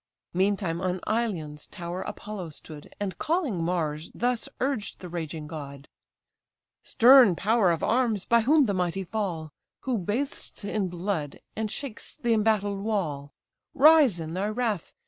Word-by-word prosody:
Meantime 190 -2 0
on 185 0 -1
Ilion's 175 -10 -2
tower 175 -1 -5
Apollo 205 -5 -6
stood, 150 0 -10
And 200 -2 -4
calling 300 - 0
Mars, 160 -3 -2
thus 245 +2 0
urged 260 -6 -2
the 180 - -8
raging 160 -2 -5
god: 140 -3 -8 0.9
"Stern 245 -5 +7
power 215 +1 +3
of 165 -2 0
arms, 230 -5 +1
by 235 0 +4
whom 290 +5 +4
the 205 - 0
mighty 180 +1 -1
fall; 175 -6 -3 0.3
Who 250 -4 -1
bathest 210 +3 -3
in 205 -1 -1
blood, 175 -4 -3 0.2
and 220 -1 -2
shakest 235 +1 -7
the 235 -1 +3
embattled 210 -2 +1
wall, 165 -10 -2 0.4
Rise 290 - +6
in 160 0 -5
thy 190 +3 -1
wrath! 215 -4 -2
200 Hz, 145 wpm, -27 LUFS, 170-225 Hz, 0.9 s, Stern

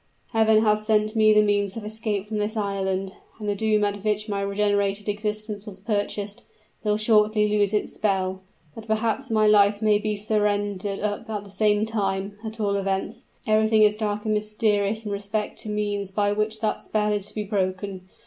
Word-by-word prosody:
Heaven 220 -1 +4
has 210 -1 +2
sent 215 0 +1
me 215 -1 +5
the 210 0 +6
means 205 -1 0
of 220 - -6
escape 215 -2 -2
from 215 0 -3
this 210 +2 -2
island 195 -2 -2 0.2
and 215 -2 -6
the 205 - +1
doom 215 +1 +1
at 205 -1 -1
which 210 0 0
my 200 -2 -2
regenerated 200 0 0
existence 210 0 -3
was 195 -2 -9
purchased, 205 0 -2 0.4
will 210 -1 +1
shortly 215 -1 +3
lose 205 -1 +2
its 210 - -1
spell. 190 -2 -1 0.3
But 225 0 -10
perhaps 225 +4 0
my 215 -1 +3
life 205 -1 +5
may 210 -1 +3
be 215 0 -1
surrendered 205 -1 -1
up 210 +2 -3
at 210 -2 -3
the 200 - -13
same 210 +1 +2
time; 200 -2 -2
at 220 0 -6
all 200 -2 +1
events, 195 -1 -3 0.2
everything 215 0 +4
is 210 0 +4
dark 210 -1 -2
and 215 - +1
mysterious 210 0 0
in 210 - -3
respect 205 +1 -3
to 215 - -6
means 205 -2 -2
by 205 +1 +1
which 215 +1 -1
that 215 - -1
spell 210 -1 0
is 205 -1 -2
to - - -10
be 210 - -2
broken. 190 -2 -3
210 Hz, 190 wpm, -24 LUFS, 200-215 Hz, 0.4 s, the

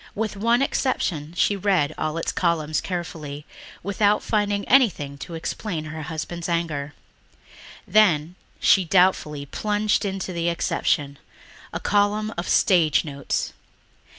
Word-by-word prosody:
With 215 -1 -2
one 230 +5 +2
exception 170 - -1
she 205 - +3
read 185 -7 +1
all 155 +1 -2
its 165 - -1
columns 160 -3 0
carefully 160 -5 -5 0.4
without 205 +2 +2
finding 205 -2 0
anything 195 - +3
to 170 - -7
explain 165 0 -4
her 155 +1 -6
husband's 165 +2 -5
anger. 150 -4 -2 0.9
Then 175 -6 +3 0.3
she 190 - +5
doubtfully 170 -5 +2
plunged 210 +6 0
into 190 -2 -3
the 170 0 0
exception... 150 -4 -1 0.5
a - - -4
column 210 +1 +1
of 175 - -4
"Stage 165 -6 +3
Notes." 140 -2 -3
175 Hz, 125 wpm, -24 LUFS, 155-205 Hz, 0.9 s, she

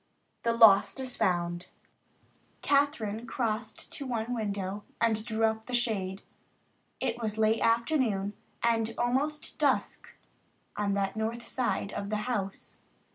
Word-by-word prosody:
THE 230 - +1
LOST 225 +1 +6
IS 260 -1 -2
FOUND 175 -1 0 1.0
Kathryn 240 -6 +1
crossed 220 -2 -3
to 285 - -5
the 265 - -6
one 235 0 -1
window 205 -3 -3 0.2
and 220 -2 +2
drew 225 -1 -2
up 220 0 -1
the 250 - -1
shade. 200 -5 -1 0.8
It 235 - -2
was 215 -1 -2
late 220 +1 +3
afternoon 230 -4 +2 0.3
and 230 -1 +2
almost 275 +5 -1
dusk - - +1 0.7
on 200 -1 0
that 195 0 0
north 225 +2 -3
side 240 -5 -1
of 200 - -4
the 215 - 0
house. 200 -6 -4
220 Hz, 130 wpm, -30 LUFS, 205-240 Hz, 1.0 s, LOST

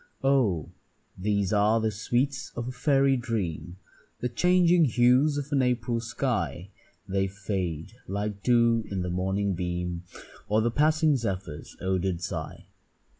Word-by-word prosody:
Oh! 120 - +2 0.4
these 100 0 0
are 105 +2 +3
the 110 0 0
sweets 125 +5 -1
of 120 0 -4
a - - -3
fairy 135 +2 +3
dream, 90 -9 -3 0.4
The 125 - -1
changing 175 +3 +4
hues 125 +4 +3
of 145 +1 -4
an 140 -2 +3
April 125 -2 0
sky. 110 - -2 0.4
They 95 0 0
fade 95 -4 -4
like 100 +1 -3
dew 115 -1 +3
in 95 -2 -2
the 90 - -3
morning 95 +2 0
beam, 90 -1 -3 0.5
Or 105 +1 +3
the 115 +2 +1
passing 155 +2 +3
zephyr's 95 -9 -5
odour'd 95 -1 0
sigh. 90 - -5
110 Hz, 135 wpm, -27 LUFS, 95-125 Hz, 0.5 s, changing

